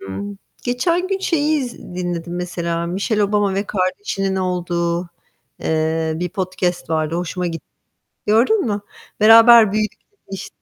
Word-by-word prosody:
Imm, 200 - -6 0.3
geçen 335 +9 0
gün 390 0 0
şeyi 310 -4 +1
iz 245 -3 -6
dinledim 175 -1 -5
mesela, 170 -1 -3
Michelle 200 +5 0
Obama 205 -1 +1
ve 200 +1 -1
kardeşinin 195 0 -1
olduğu, 175 -1 -1 0.5
eee, 160 0 0
bir 180 +2 -2
podcast 180 -2 -2
vardı, 155 0 0
hoşuma 180 +1 -2
gitti. 165 -1 -5 0.6
Gördün 245 - +3
mü? 205 -2 -1 0.4
"Beraber 225 0 +8
büyüdük." 215 0 -1 0.3
demiş 195 - -6
185 Hz, 130 wpm, -20 LUFS, 170-215 Hz, 0.6 s, Beraber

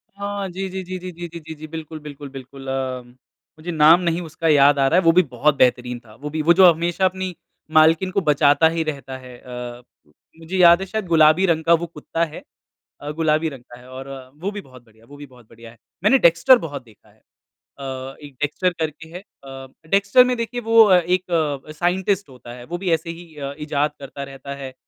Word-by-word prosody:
हाँ, 200 0 -4
जी, 190 +2 -5
जी, 190 +1 -5
जी, 185 +1 -6
जी, 180 0 -7
जी, 175 0 -8
जी, 170 0 -9
जी, 160 0 -9
जी, 155 +1 -10
बिल्कुल, 160 0 -8
बिल्कुल, 145 -1 -10
बिल्कुल 135 0 -11
अम, 130 -2 -4 0.5
मुझे 175 +3 -5
नाम 160 +2 +6
नहीं 170 0 -1
उसका 160 0 -4
याद 145 -2 +5
आ 135 - +3
रहा 170 +6 +4
है, - - -1
वो 165 - +7
भी 180 +2 +5
बहुत 140 +4 +2
बेहतरीन 125 -1 +1
था। 110 - -16
वो 150 - -5
भी 155 +1 -3
वो 165 +3 +5
जो 190 - +9
हमेशा 170 +3 -1
अपनी 185 -1 -2 0.4
मालकिन 165 +4 +4
को 195 - 0
बचाता 150 0 +4
ही 165 - 0
रहता 135 -3 -7
है। 125 -1 -13
अ, 125 -1 -8 0.6
मुझे 165 +3 -5
याद 170 -1 +7
है, - - -3
शायद 215 +1 -4
गुलाबी 160 +2 +4
रंग 160 -3 +1
का 170 - +4
वो - - -4
कुत्ता 165 +1 -4
है। 155 - -11 0.6
अ, 145 - -6
गुलाबी 155 0 0
रंग 135 -5 -10
का 120 - -12
है 125 - -16
और 130 +1 -9 0.3
वो 190 +4 -2
भी 205 0 -7
बहुत 130 -6 -17
बढ़िया 110 -1 -24
वो 145 - -14
भी 145 0 -10
बहुत 125 -4 -20
बढ़िया 115 0 -14
है। 115 - -20 0.3
मैंने 265 +6 +5
डेक्स्टर 170 +10 +5
बहुत 145 -3 -7
देखा 110 -3 -22
है - - -27 0.6
अ, 135 0 -6
एक 145 -1 -12
डेक्स्टर 160 +5 0
करके 160 0 -4
है। 175 +2 -8 0.2
अ, 135 -1 -10 0.2
डेक्स्टर 200 +6 +5
में, 250 0 0
देखिए, 235 +1 -4
वो 225 0 +6
अ, 190 -4 +5
एक 165 -5 -1
साइंटिस्ट 190 +1 0
होता 125 -2 -12
है। 120 0 -11
वो 175 +6 -5
भी 180 -1 -2
ऐसे 165 +1 -2
ही 165 -1 -10
अ, 140 -1 -6
इजाद 150 0 -1
करता 140 0 -8
रहता 140 0 -8
है। 135 -2 -8
155 Hz, 225 wpm, -21 LUFS, 135-175 Hz, 0.6 s, जो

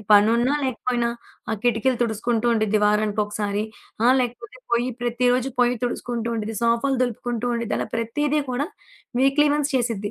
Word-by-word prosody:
ఈ - - -11
పనున్నా, 230 +5 +5
లేకపోయినా 245 -2 0 0.4
ఆ - - 0
కిటికిలు 245 +1 +2
తుడుసుకుంటూ 230 0 0
ఉండిద్ది 215 -2 +2
వారానినికి 210 0 +2
ఒకకసారి, 205 0 -2 0.4
ఆ! - - +6
లేకపోతే 240 0 -4
పొయ్యి 240 +1 +2
ప్రతిరోజు 245 +2 +1
పొయ్యి 245 0 +3
తుడుసుకుంటూ 240 -1 -2
ఉండిద్ది, 220 0 -3
సోఫాలు 235 +4 +2
దులుపుకుంటూ 240 0 -2
ఉండిద్ది, 235 -1 -2
అలా - - -2
ప్రతీదీ 290 +6 0
కూడా 260 +4 -1 0.5
వీక్లీ 275 +3 +4
వన్స్ 295 0 0
చేసిద్ది. 230 -5 -1
235 Hz, 150 wpm, -23 LUFS, 220-250 Hz, 0.5 s, ఆ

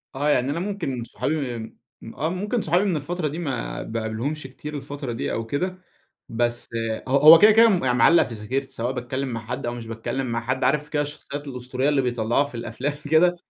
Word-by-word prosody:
آه 145 +2 0
يعني 135 -1 +2
أنا 165 - -2
ممكن 175 - -3
صحابي 135 -1 -2
ام 110 -1 -8 0.4
آه 160 +3 -1
ممكن 205 +5 -1
صحابي 175 +5 +2
من 185 -5 +1
الفترة 165 +2 -2
دي 155 +4 -5
ما 135 -8 -3
باقابلهمش 115 +7 -3
كتير 150 +3 -8
الفترة 140 -2 -6
دي 115 - -3
أو 115 - -2
كده، 180 +9 -2 0.5
بس 120 +1 -1 0.4
ه - - -7
هو 155 +4 +9
كده 215 +1 +8
كده 225 +1 +7
م 130 -11 +2
معلّق 165 +8 +6
في 120 - -7
ذاكرتي 130 +6 -3
سواء 120 +3 -3
باتكلم 130 +2 -3
مع 115 -1 -5
حد 120 - -4
أو 120 - -2
مش 120 -1 -7
باتكلم 115 +4 -3
مع 115 -1 -2
حد، 130 +3 -2
عارف 150 0 +1
كده 145 -1 0
الشخصيات 145 0 -6
الأسطورية 130 +2 -2
اللي 140 -2 +2
بيطلّعوها 120 +2 +1
في 140 - -10
الأفلام 120 +5 -3 0.2
كده؟ 175 +2 +5
135 Hz, 205 wpm, -24 LUFS, 120-155 Hz, 0.5 s, هو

